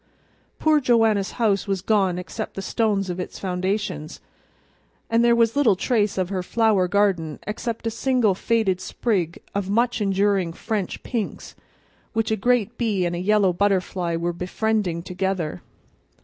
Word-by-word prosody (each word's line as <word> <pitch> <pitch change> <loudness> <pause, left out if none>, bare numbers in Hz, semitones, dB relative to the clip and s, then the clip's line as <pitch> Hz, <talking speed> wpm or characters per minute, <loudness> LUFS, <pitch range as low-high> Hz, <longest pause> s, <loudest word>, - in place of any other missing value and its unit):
Poor 310 -1 +3
Joanna's 225 -6 +2
house 205 -5 +1
was 195 -2 -1
gone 195 -4 +2
except 180 - -6
the 195 - -5
stones 200 -4 0
of 175 - -5
its 180 - -5
foundations, 185 -3 -3 0.9
and 230 +1 +4
there 235 0 +5
was 230 0 +3
little 260 -9 +4
trace 210 0 0
of 185 -1 0
her 190 -2 -2
flower 210 -1 +2
garden 180 -6 +1
except 225 +2 -4
a 225 - 0
single 245 -3 +2
faded 195 -2 0
sprig 185 -8 -2
of 200 -1 -2
much 235 +2 +1
enduring 195 -3 +1
French 210 0 -3
pinks, 230 -5 -4 0.6
which 225 -1 0
a - - +3
great 235 +1 +1
bee 210 -6 +1
and 175 0 -1
a - - -3
yellow 200 0 +3
butterfly 185 -2 0
were 170 +1 -1
befriending 180 -1 -1
together. 180 - -2
200 Hz, 150 wpm, -23 LUFS, 180-225 Hz, 0.9 s, there